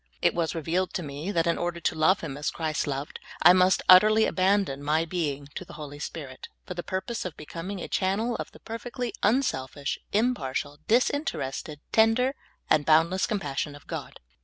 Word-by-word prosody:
It -, -, +3 dB
was 170 Hz, -1 st, -1 dB
re 165 Hz, -, -3 dB
vealed 180 Hz, +4 st, 0 dB
to 180 Hz, -, -2 dB
me 145 Hz, +6 st, -5 dB
that 165 Hz, -4 st, +1 dB
in 170 Hz, -, +1 dB
order 175 Hz, 0 st, -2 dB
to 170 Hz, -, 0 dB
love 160 Hz, +5 st, +3 dB
him 150 Hz, -5 st, -5 dB
as 150 Hz, +1 st, -2 dB
Christ 155 Hz, -3 st, -2 dB
loved, 140 Hz, +1 st, -4 dB, 0.2 s
I 175 Hz, +2 st, +9 dB
must 185 Hz, 0 st, +4 dB
utterly 215 Hz, +4 st, +7 dB
abandon 185 Hz, -7 st, +1 dB
my 155 Hz, +3 st, +1 dB
being 150 Hz, -5 st, -2 dB
to -, -, -5 dB
the -, -, -13 dB
Holy 145 Hz, -2 st, -8 dB
Spirit, 140 Hz, -4 st, -7 dB, 0.2 s
for -, -, -5 dB
the 175 Hz, -, -4 dB
purpose 190 Hz, +6 st, -3 dB
of 180 Hz, -4 st, -6 dB
becoming 170 Hz, +6 st, -6 dB
a -, -, -5 dB
channel 210 Hz, +5 st, 0 dB
of -, -, -6 dB
the -, -, -15 dB
perfectly 240 Hz, +2 st, -5 dB
unselfish, 145 Hz, -, 0 dB
impartial, 150 Hz, -, -1 dB
disinterested, 155 Hz, -, 0 dB
tender, 225 Hz, +4 st, +4 dB, 0.3 s
and 155 Hz, -1 st, +3 dB
bound 160 Hz, +3 st, +4 dB
less 185 Hz, 0 st, 0 dB
compassion 150 Hz, -, -2 dB
of 145 Hz, -, -14 dB
God. -, -, -7 dB
170 Hz, 185 wpm, -27 LUFS, 150-205 Hz, 0.3 s, I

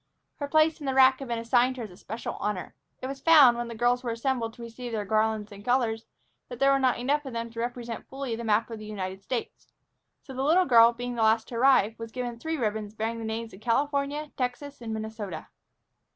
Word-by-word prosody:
Her 285 Hz, -, -3 dB
place 310 Hz, +2 st, +3 dB
in 290 Hz, -, -6 dB
the 265 Hz, -, 0 dB
rack 265 Hz, 0 st, +6 dB
had 270 Hz, -, -6 dB
been 235 Hz, -1 st, -2 dB
assigned 245 Hz, +2 st, +2 dB
her 240 Hz, -, -4 dB
as 210 Hz, -, -8 dB
a -, -, -13 dB
special 225 Hz, +5 st, -6 dB
honor. 210 Hz, -3 st, -3 dB, 0.3 s
It -, -, -1 dB
was 275 Hz, +1 st, -5 dB
found, 295 Hz, -7 st, +7 dB
when 240 Hz, 0 st, -3 dB
the 235 Hz, -, -7 dB
girls 245 Hz, +2 st, +1 dB
assembled 235 Hz, -1 st, -2 dB
to 240 Hz, -, -10 dB
receive 235 Hz, +1 st, -7 dB
their 210 Hz, -2 st, -2 dB
garlands 215 Hz, 0 st, 0 dB
and 200 Hz, 0 st, -11 dB
colors, 230 Hz, -2 st, 0 dB, 0.4 s
that 245 Hz, -, -7 dB
there 275 Hz, +2 st, +4 dB
were 275 Hz, -, +3 dB
not 260 Hz, -2 st, +2 dB
enough 280 Hz, +5 st, 0 dB
of 265 Hz, -3 st, -7 dB
them 230 Hz, 0 st, -4 dB
to 230 Hz, -, -8 dB
represent 240 Hz, -1 st, -4 dB
fully 265 Hz, -3 st, -4 dB
the 235 Hz, -, -6 dB
map 225 Hz, +1 st, +1 dB
of 225 Hz, -, -6 dB
the 215 Hz, -, -9 dB
United 190 Hz, -2 st, -5 dB
States. 240 Hz, +3 st, -5 dB, 0.6 s
So 265 Hz, -, -10 dB
the 260 Hz, -, -3 dB
little 330 Hz, +7 st, +4 dB
girl, 235 Hz, -2 st, +7 dB
being 245 Hz, +1 st, -5 dB
the 235 Hz, -, -2 dB
last 220 Hz, 0 st, +3 dB
to 240 Hz, -, -7 dB
arrive, 230 Hz, -4 st, +4 dB
was 230 Hz, 0 st, -7 dB
given 245 Hz, -1 st, -5 dB
three 320 Hz, +4 st, -3 dB
ribbons 215 Hz, -3 st, -2 dB
bearing 225 Hz, +1 st, -2 dB
the 225 Hz, -, -5 dB
names 225 Hz, +1 st, -4 dB
of 190 Hz, -, -13 dB
California, 285 Hz, +5 st, 0 dB
Texas, 265 Hz, +2 st, -4 dB
and 230 Hz, -1 st, -5 dB
Minnesota. 220 Hz, -6 st, -5 dB
235 Hz, 235 wpm, -27 LUFS, 220-265 Hz, 0.6 s, found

